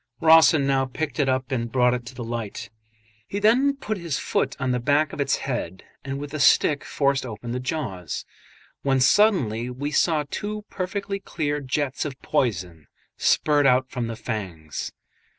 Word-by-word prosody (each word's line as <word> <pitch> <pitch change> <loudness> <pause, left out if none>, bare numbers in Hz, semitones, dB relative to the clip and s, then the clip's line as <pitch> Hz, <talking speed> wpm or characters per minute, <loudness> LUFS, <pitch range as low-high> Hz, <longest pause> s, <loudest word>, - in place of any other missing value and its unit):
Rawson 160 -2 +6
now 135 -1 +2
picked 145 +1 -4
it 140 -2 +2
up 130 0 -1
and 115 -3 -2
brought 125 -1 +3
it 120 -1 -4
to 130 - -9
the 120 - -5
light. 115 -4 -5 0.6
He 200 - -4
then 250 +7 +4
put 215 -7 -4
his 170 -5 -2
foot - - -1
on 130 -1 0
the 125 - +1
back 145 +4 +2
of - - -3
its 135 -1 +2
head 95 -9 -4 0.2
and 135 0 -4
with 145 0 -7
a 155 - -3
stick 145 +1 +4
forced 140 -1 0
open 115 -1 -6
the 125 - -2
jaws, 125 - -4 0.6
when 135 -1 +2
suddenly 125 - +3
we 140 +4 -4
saw 155 0 +2
two 210 0 -4
perfectly 195 +1 -3
clear 150 -6 -2
jets 135 +1 -1
of 140 -3 -6
poison 90 - -1 0.3
spurt 145 -2 +3
out 130 0 +3
from 120 -3 -2
the 115 - -4
fangs. 95 - -5
135 Hz, 175 wpm, -24 LUFS, 120-155 Hz, 0.6 s, Rawson